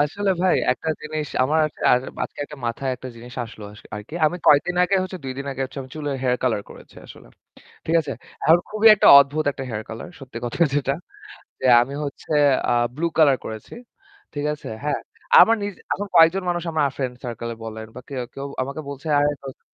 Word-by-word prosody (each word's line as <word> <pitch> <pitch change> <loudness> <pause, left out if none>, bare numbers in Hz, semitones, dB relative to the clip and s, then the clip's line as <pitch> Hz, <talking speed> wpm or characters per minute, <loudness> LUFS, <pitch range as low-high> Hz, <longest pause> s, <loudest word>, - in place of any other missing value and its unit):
আসলে 195 +7 0
ভাই 185 - +4 0.2
একটা 145 +5 -6
জিনিস 155 0 -4 0.2
আমার 155 +5 +2 0.3
আর 125 - +5 0.2
আজকে - - -11
একটা 150 - -11
মাথায় 130 +3 -2
একটা 130 - -8
জিনিস 120 +1 -11
আসলো 110 -2 -11
আস 105 - -14
আরকি। 105 +9 -9
আমি 175 - -1
কয়েকদিন 165 +5 +4
আগে 195 +2 +2
হচ্ছে 185 0 -6
২ 135 +1 -5
আগে 135 - -3
হচ্ছে 135 - -8
আমি 130 - -13
চুলে 145 -2 -3
হেয়ার 125 -1 +1
কালার 110 -5 +1
করেছি - - -15
আসলে, - - -14 0.6
ঠিক 165 - +1
আছে? 145 -3 -6 0.3
এখন 165 +2 +6
খুবই 215 +1 +4
একটা 205 - +4
অদ্ভুত 140 +3 +1
একটা 135 - -7
হেয়ার 110 -2 -4
কলার 115 +10 -7
সত্যি 130 -4 -9
কথা 120 +8 -4
যেটা। 140 -1 +1 0.7
যে - - -2 0.2
আমি 130 +3 -3
হচ্ছে 140 - -8 0.4
আ - - +2 0.2
ব্লু 160 +4 -1
কালার 145 -5 +5
করেছি, 110 -1 -8 0.6
ঠিক 145 0 -3
আছে? 150 - -10 0.2
হ্যাঁ? 150 - -1 0.4
আমার 230 - +7
নিজে 200 -2 -5 0.2
এখন 205 - -4
কয়েকজন 165 +3 +6
মানুষ 175 -1 -1
আমার 155 -3 +2
ফ্রেন্ড 130 -2 -3
সার্কেল 115 -1 -5
বলেন 110 0 -7
বা - - -7
কেউ, 135 -3 -4
কেউ 135 - -6 0.2
আমাকে 140 +4 -6
বলছে 140 +2 -8
"আরে 145 0 +3
দোস্ত 135 -1 -9
140 Hz, 200 wpm, -22 LUFS, 125-160 Hz, 0.7 s, আমার